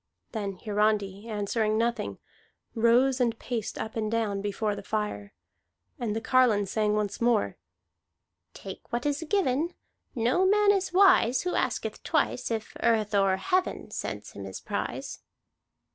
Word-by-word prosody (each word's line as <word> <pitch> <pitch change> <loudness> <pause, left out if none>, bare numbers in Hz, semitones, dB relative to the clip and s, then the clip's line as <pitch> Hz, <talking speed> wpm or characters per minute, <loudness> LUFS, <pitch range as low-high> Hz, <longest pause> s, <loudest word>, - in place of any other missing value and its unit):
Then 205 -4 -3
Hiarandi, 210 -1 0
answering 215 0 0
nothing, 235 +1 -1 0.6
rose 245 +3 +3
and 235 -2 +1
paced 230 -3 -4
up 220 - -5
and 215 -1 -1
down 215 -4 0
before 205 +1 -1
the 200 - -7
fire. 210 -1 -3 0.7
And 225 -4 -2
the - - 0
carline 230 -4 +3
sang 210 +1 0
once 210 0 -2
more: 230 -3 +1 1.0
"Take - - -9
what 240 +2 -2
is 290 +2 0
given. 340 -4 +1 0.4
No 245 +10 +2
man 415 +1 +5
is 385 -2 0
wise 360 -10 +5
Who 360 - -1
asketh - - -1
twice - - 0
If 225 -2 -4
earth 220 -3 +2
or 195 -2 +3
heaven 365 - -1
Sends - - -5
him - - -8
his - - -7
prize." - - -4
225 Hz, 145 wpm, -28 LUFS, 210-255 Hz, 1.0 s, man